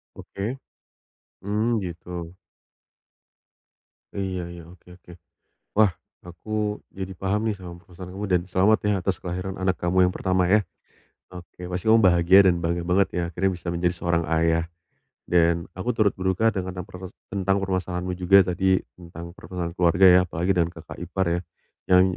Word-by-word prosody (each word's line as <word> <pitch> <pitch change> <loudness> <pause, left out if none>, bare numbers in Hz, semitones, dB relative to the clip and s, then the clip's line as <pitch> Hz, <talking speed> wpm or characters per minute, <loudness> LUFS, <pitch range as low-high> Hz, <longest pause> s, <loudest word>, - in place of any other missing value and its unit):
Oke. 110 +7 -5 0.8
Mmm, 110 +3 0
gitu. 90 -1 -7 1.8
Iya 95 -2 -3
iya, 85 -1 -10
oke 90 0 -18
oke. 90 - -15 0.7
Wah, 105 -5 +5 0.3
aku 105 +4 -3
jadi 95 0 -6
paham 100 +4 -1
nih 110 - +1
sama 90 -3 -10
permasalahan 90 +1 -12
kamu 105 - -3
dan 90 - +3
selamat 100 +5 +4
ya - - +3
atas 95 0 0
kelahiran 90 +1 -4
anak 95 -1 +1
kamu 90 +1 +3
yang - - -6
pertama 90 -1 +1
ya. 105 -1 +4 0.7
Oke, 90 0 -10
pasti 90 +4 -3
kamu 115 - +7
bahagia 90 +1 +5
dan 90 - +5
bangga 85 +1 -1
banget 95 +1 +3
ya 90 - -2
akhirnya 90 +3 0
bisa 85 - -16
menjadi 90 +1 0
seorang 85 -1 0
ayah, 80 0 +2 0.6
dan 85 -1 +2
aku 95 +7 -3
turut 105 -3 +3
berduka 95 +4 +1
dengan 95 -2 -3
yang 90 - -5
proses 95 -1 -9 0.2
tentang 95 0 +1
permasalahanmu 90 -1 -2
juga 95 +2 +5
tadi 95 +1 +2 0.2
tentang 85 0 -10
pertengkaran 85 -3 -6
keluarga 90 +1 +4
ya. 90 0 +8
Apalagi 90 +1 -2
dengan 85 -1 +1
kakak 85 -2 -11
ipar 95 +2 -2
ya, 85 - -1 0.5
yang 90 0 +7
90 Hz, 160 wpm, -24 LUFS, 85-95 Hz, 1.8 s, ya